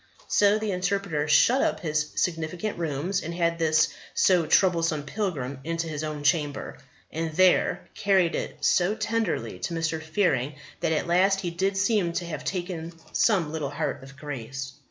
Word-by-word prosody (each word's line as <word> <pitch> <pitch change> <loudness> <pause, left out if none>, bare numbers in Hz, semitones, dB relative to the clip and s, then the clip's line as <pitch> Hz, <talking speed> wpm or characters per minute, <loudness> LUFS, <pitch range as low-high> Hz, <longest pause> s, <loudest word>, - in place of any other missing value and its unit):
So 205 +1 +4
the 215 -1 -2
Interpreter 180 -4 -1
shut 240 - +5
up - - 0
his 150 -2 -1
significant 175 +4 -2
rooms, 165 +4 -1
and 170 +1 -5
had 170 -1 0
this 155 -1 +3 0.3
so 180 -4 +4
troublesome 165 -5 +3
pilgrim 145 -6 -3
into 165 +1 -2
his 155 -1 -4
own 150 -1 -4
chamber, 145 -2 0 0.3
and 160 0 -2
there 185 +2 +3
carried 190 -4 +2
it - - -4
so 185 +3 +3
tenderly 220 -3 -2
to 170 - -3
Mr. 165 -1 -1
Fearing 155 -5 0 0.2
that 160 - 0
at 160 - 0
last 190 +3 +3
he 175 -3 -3
did 195 +3 -1
seem 200 -4 +2
to 175 - -2
have 155 -4 -5
taken 175 -3 -4 0.2
some 185 -9 +2
little 155 -3 -3
heart 145 -1 -3
of 135 0 -13
grace. 135 -2 -6
165 Hz, 165 wpm, -26 LUFS, 155-185 Hz, 0.3 s, shut